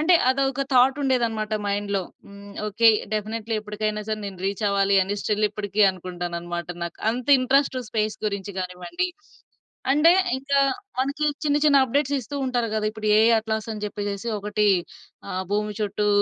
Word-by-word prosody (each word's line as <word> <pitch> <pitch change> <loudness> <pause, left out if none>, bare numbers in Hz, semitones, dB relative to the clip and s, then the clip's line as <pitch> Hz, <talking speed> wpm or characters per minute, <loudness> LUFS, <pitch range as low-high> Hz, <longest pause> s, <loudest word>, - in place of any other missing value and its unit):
అంటే, 335 +4 +5
అదొక 270 0 +1
థాటుండేదనమాట 250 -4 +2
మైండ్‌‌లో. 200 0 -1 0.3
హ్మ్. 200 0 -12 0.2
ఓకే. 220 +2 +4 0.2
డెఫినెట్లీ 220 +1 -2
ఎప్పటికైనా 210 0 -3
సరే, 215 - -1
నేను 195 -2 -7
రీచ్ 200 +2 -2
అవ్వాలి 200 0 +2
అని, 195 +2 -2
స్టిల్ 210 0 0
ఇప్పడికీ 205 0 -3
అనుకుంటాననమాట. 175 -1 -5 0.2
నాకు 170 -1 -5
అంత 245 +3 -5
ఇంట్రెస్టు, 260 0 +2
స్పేస్ 215 -1 -1
గురించి 200 -1 -4
గానివ్వండి 185 - -3 0.8
అంటే, 315 +4 +6 0.3
ఇంకా 275 +1 +1 0.4
మనకి 280 +3 -1 0.2
చిన్న 290 -1 +2
చిన్న 280 -2 +5
అప్‌డేట్స్ 280 +2 0
ఇస్తూ 270 +5 -7
ఉంటారు 245 -3 -1
గదా! 215 -1 0
ఇప్పుడు 215 -1 -3
ఏఐ 225 +1 +5
అట్లాస్ 220 0 -3
అని 210 -1 -5
జెప్పేసేసి 205 +1 -4
ఒకటి 210 +1 0 0.6
ఆహ్, 185 +1 -3
భూమి 210 0 -1
చుట్టూ 210 0 0
215 Hz, 150 wpm, -24 LUFS, 200-255 Hz, 0.8 s, అంటే